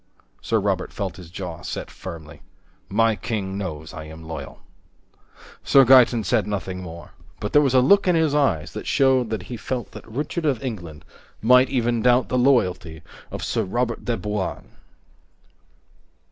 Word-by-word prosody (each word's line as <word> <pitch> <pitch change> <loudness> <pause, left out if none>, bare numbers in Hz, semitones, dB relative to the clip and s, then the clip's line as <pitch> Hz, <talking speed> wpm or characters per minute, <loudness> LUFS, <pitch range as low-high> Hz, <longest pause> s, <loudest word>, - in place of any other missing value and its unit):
Sir 115 - +1
Robert 95 -2 -1
felt 100 -1 -4
his 90 -3 -11
jaw 90 -2 -7
set - - -6
firmly. 80 -5 -10 0.5
"My 115 +2 +2
king 100 -4 -4
knows 80 -5 -5
I 80 -3 -7
am 80 +1 -11
loyal." 80 -4 -8 1.0
Sir 135 -1 +6
Gaeton 125 -2 +6
said 100 +1 +1
nothing 95 -3 -4
more, 85 -1 -10 0.3
but 105 - -4
there 145 - +7
was 135 -3 +1
a 130 - +7
look 200 +9 +4
in 180 - +4
his 160 -3 +2
eyes 110 - +1
that - - -7
showed 130 -3 +3
that 110 -4 -3
he 120 - -7
felt 125 +2 -4
that - - -11
Richard 150 +7 -3
of 135 -5 0
England 85 - -6 0.3
might 125 +3 +5
even 120 -3 0
doubt 125 +2 +3
the 125 - +1
loyalty 90 - +1 0.3
of - - -6
Sir - - 0
Robert 120 +4 -2
de 120 -1 0
Bouain. 105 -3 -4
110 Hz, 165 wpm, -23 LUFS, 90-125 Hz, 1.0 s, there